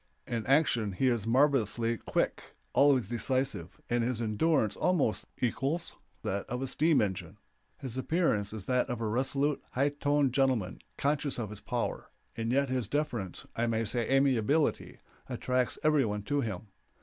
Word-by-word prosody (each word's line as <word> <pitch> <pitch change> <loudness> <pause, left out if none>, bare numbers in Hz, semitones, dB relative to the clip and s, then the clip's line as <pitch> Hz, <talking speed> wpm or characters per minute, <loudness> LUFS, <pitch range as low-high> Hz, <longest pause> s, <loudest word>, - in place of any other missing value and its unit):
In 115 -3 -3
action 125 -8 +3
he 110 - 0
is 115 -3 -1
marvelously 115 -3 +2
quick, - - -2 0.2
always 140 -6 +4
decisive, 120 -5 -2
and 120 0 +1
his 120 -1 -1
endurance 115 0 +1
almost 165 -12 +1
equals 135 +8 -1 0.3
that 100 +1 -2
of 125 +2 -2
a - - 0
steam 150 +1 +3
engine. 95 -1 -4 0.4
His 130 -2 -6
appearance 130 - +1
is 110 -3 -7
that 125 -1 +1
of 120 -2 -3
a 115 - -2
resolute, 135 +6 0
high 140 +3 +2
toned 145 -2 +1
gentleman, 130 -9 +1 0.2
conscious 145 -1 0
of 110 -4 -4
his 105 - -9
power, - - -3 0.3
and 115 0 -2
yet 140 +2 +2
his 130 -4 -1
deference, 120 - -3
I 115 +1 0
may 115 0 0
say 120 +1 0
amiability, 135 +2 +2 0.3
attracts 125 -1 0
every 150 -2 +4
one 105 -2 -2
to 145 +6 0
him. 110 -3 -5
125 Hz, 160 wpm, -30 LUFS, 110-140 Hz, 0.4 s, always